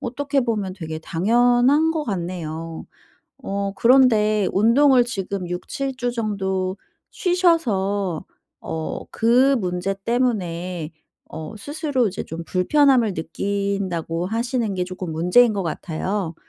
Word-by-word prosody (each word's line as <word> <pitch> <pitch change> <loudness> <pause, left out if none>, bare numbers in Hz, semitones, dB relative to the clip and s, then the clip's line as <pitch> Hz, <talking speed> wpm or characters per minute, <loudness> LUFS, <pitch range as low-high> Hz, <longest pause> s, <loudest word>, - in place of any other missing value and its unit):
어떻게 280 +3 -1
보면 210 -6 -2
되게 160 -4 -6
당연한 245 - +3
것 315 -2 -2
같네요. 165 -4 -5 0.6
어 200 -1 -2
그런데 215 -4 +4
운동을 245 +4 +5
지금 195 -4 -4
6-7 265 +9 -4
주 245 -1 -1
정도 190 -5 -2 0.4
쉬셔서 205 - +1 0.4
어 160 -1 -4
그 250 +4 +4
문제 180 +1 -2
때문에 180 -9 -1 0.4
어 160 +8 -7
"스스로 285 - -1
이제 195 - -4
좀 165 +1 -7
불편함을 245 +3 +3
느낀다."고 180 -1 -2
하시는 230 -1 -1
게 180 - 0
쪼끔 185 -2 -6
문제인 180 +9 +4
것 200 - -1
같아요. 170 +2 -3
200 Hz, 235 characters per minute, -22 LUFS, 180-245 Hz, 0.6 s, 운동을